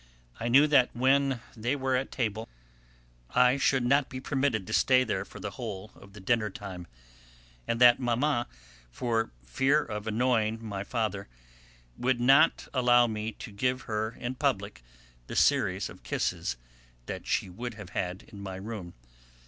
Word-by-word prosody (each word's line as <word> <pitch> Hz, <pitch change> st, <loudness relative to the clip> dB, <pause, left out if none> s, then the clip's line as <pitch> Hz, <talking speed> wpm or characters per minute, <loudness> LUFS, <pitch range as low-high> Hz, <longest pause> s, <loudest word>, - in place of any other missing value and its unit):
I 115 Hz, -, -2 dB
knew 135 Hz, +5 st, +6 dB
that 140 Hz, -4 st, +4 dB
when 135 Hz, 0 st, +2 dB
they 120 Hz, +5 st, -1 dB
were 130 Hz, -2 st, 0 dB
at 130 Hz, +1 st, -2 dB
table 110 Hz, -3 st, -2 dB, 0.9 s
I 125 Hz, +2 st, +5 dB
should 130 Hz, -2 st, +2 dB
not 140 Hz, +2 st, +3 dB
be 130 Hz, -, -6 dB
permitted 130 Hz, -6 st, 0 dB
to -, -, -6 dB
stay 130 Hz, -1 st, +4 dB
there 115 Hz, -, -2 dB
for -, -, -12 dB
the -, -, -5 dB
whole 95 Hz, +3 st, -7 dB
of 100 Hz, 0 st, -16 dB
dinner 115 Hz, -2 st, +2 dB
time, 95 Hz, -3 st, -8 dB, 0.8 s
and 115 Hz, -, -1 dB
that 120 Hz, -1 st, +7 dB
Mamma, 120 Hz, +1 st, 0 dB, 0.4 s
for 115 Hz, -, -1 dB, 0.2 s
fear 135 Hz, -, +2 dB
of 105 Hz, 0 st, -6 dB
annoying 115 Hz, -1 st, +1 dB
my 100 Hz, -2 st, -4 dB
father, 105 Hz, -3 st, -2 dB, 0.7 s
would 125 Hz, 0 st, +1 dB
not 135 Hz, +6 st, +4 dB
allow 120 Hz, -2 st, +5 dB
me 110 Hz, -1 st, -3 dB
to 110 Hz, -, -9 dB
give 125 Hz, +5 st, -1 dB
her 110 Hz, -1 st, -2 dB
in 120 Hz, +1 st, -3 dB
public 125 Hz, -, -1 dB, 0.5 s
the -, -, -6 dB
series -, -, +2 dB
of -, -, -13 dB
kisses -, -, -2 dB, 0.5 s
that -, -, -6 dB
she -, -, 0 dB
would 115 Hz, +6 st, -6 dB
have 105 Hz, -5 st, -10 dB
had 90 Hz, +1 st, -3 dB
in 100 Hz, -, -12 dB
my 95 Hz, -1 st, -6 dB
room. 95 Hz, -3 st, -7 dB
120 Hz, 160 wpm, -29 LUFS, 105-130 Hz, 0.9 s, that